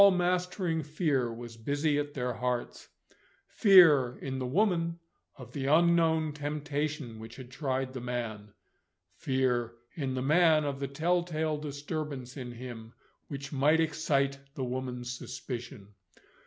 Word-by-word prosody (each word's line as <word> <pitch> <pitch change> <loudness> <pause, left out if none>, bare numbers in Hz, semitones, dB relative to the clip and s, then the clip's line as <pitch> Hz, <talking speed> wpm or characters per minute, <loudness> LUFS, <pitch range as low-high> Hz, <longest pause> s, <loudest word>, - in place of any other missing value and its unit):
All 200 - +10
mastering 180 -2 0
fear 150 -5 0
was 115 0 -8
busy 145 +5 0
at 145 0 -4
their 125 -2 -1
hearts; 125 +2 -3 0.6
fear, 155 - +6
in 130 -1 -4
the 130 - -2
woman, 170 +1 +1 0.4
of 125 -2 -12
the 135 -2 -2
unknown 160 0 +4
temptation 145 -4 -3
which 110 +1 -9
had 130 -2 -10
tried 130 -1 -2
the 130 - -5
man; 110 -4 -4 0.6
fear, 125 -2 0 0.2
in 135 -6 -3
the 130 - -1
man, 155 +1 +5
of 140 -1 -2
the 140 - -2
tell 170 +6 +1
tale 160 -2 -1
disturbance 145 -3 -5
in 125 -3 -6
him, 120 -2 -9 0.3
which 140 0 -6
might 145 +4 +4
excite 140 -3 +1 0.2
the 135 - -3
woman's 125 -1 -4
suspicion. 120 -5 -7
140 Hz, 140 wpm, -30 LUFS, 125-155 Hz, 0.6 s, All